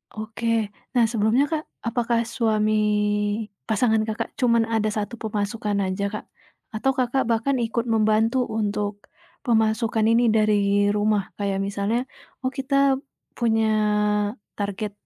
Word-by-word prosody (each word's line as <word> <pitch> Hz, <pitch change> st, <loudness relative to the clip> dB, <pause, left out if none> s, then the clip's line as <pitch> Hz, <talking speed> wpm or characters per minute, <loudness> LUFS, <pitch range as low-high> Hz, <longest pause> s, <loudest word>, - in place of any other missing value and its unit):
Oke. 220 Hz, 0 st, -1 dB, 0.2 s
Nah, 240 Hz, -, +5 dB
sebelumnya, 225 Hz, +5 st, +2 dB
Kak, 310 Hz, -1 st, -1 dB, 0.2 s
apakah 235 Hz, 0 st, +1 dB
suami 220 Hz, -2 st, 0 dB, 1.0 s
pasangan, 220 Hz, 0 st, +2 dB
Kakak, 220 Hz, 0 st, -3 dB
cuman 235 Hz, -3 st, +3 dB
ada 215 Hz, -1 st, +1 dB
satu 215 Hz, +2 st, -3 dB
pemasukan 210 Hz, 0 st, -2 dB
aja, 190 Hz, +1 st, -2 dB
Kak? -, -, -5 dB, 0.5 s
Atau, 245 Hz, +5 st, +1 dB
Kakak, 260 Hz, +1 st, +1 dB
bahkan 235 Hz, +4 st, +1 dB
ikut 235 Hz, 0 st, -1 dB
membantu 220 Hz, +3 st, +2 dB
untuk 205 Hz, -1 st, -2 dB, 0.4 s
pemasukan 220 Hz, -1 st, +1 dB
ini 230 Hz, +2 st, +4 dB
dari 205 Hz, -2 st, +3 dB
rumah. 210 Hz, -1 st, +2 dB
Kayak 200 Hz, -1 st, -1 dB
misalnya, 205 Hz, +4 st, -1 dB, 0.4 s
"Oh 260 Hz, -1 st, -2 dB
kita 270 Hz, +1 st, -1 dB, 0.6 s
punya 225 Hz, -2 st, +2 dB, 0.9 s
target 205 Hz, 0 st, -3 dB
220 Hz, 120 wpm, -24 LUFS, 210-235 Hz, 1.0 s, Nah